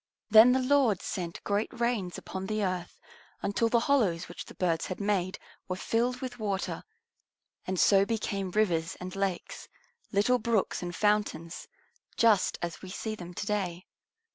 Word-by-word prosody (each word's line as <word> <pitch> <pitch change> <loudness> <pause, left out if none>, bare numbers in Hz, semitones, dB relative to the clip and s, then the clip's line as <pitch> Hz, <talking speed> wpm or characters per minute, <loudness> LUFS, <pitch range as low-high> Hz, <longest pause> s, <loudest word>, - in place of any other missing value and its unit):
Then 220 +3 +9
the 260 - +3
Lord 255 -7 +3
sent 175 -2 -4
great 205 +2 0
rains 235 -7 0
upon 190 0 -6
the 215 0 -1
earth 185 -2 -3 0.4
until 205 +3 +1
the 235 0 +3
hollows 210 -12 +2
which 175 - -8
the - - -13
birds 170 -3 0
had 185 - -5
made 195 -3 0 0.3
were 185 - -2
filled 240 +6 0
with 250 -2 -6
water, 200 -3 -2 0.8
and 185 -1 -1
so 195 +2 +6
became 200 -3 -2
rivers 180 -4 0
and 180 +1 -6
lakes, 195 -3 -3 0.4
little 220 +5 +3
brooks 225 -3 0
and 175 -1 -5
fountains, 205 -5 0 0.5
just 220 -5 +4
as 170 -1 -4
we 190 - -9
see 220 +3 -4
them 175 -4 -9
to - - -3
day. 185 -4 -2
200 Hz, 160 wpm, -29 LUFS, 180-220 Hz, 0.8 s, Then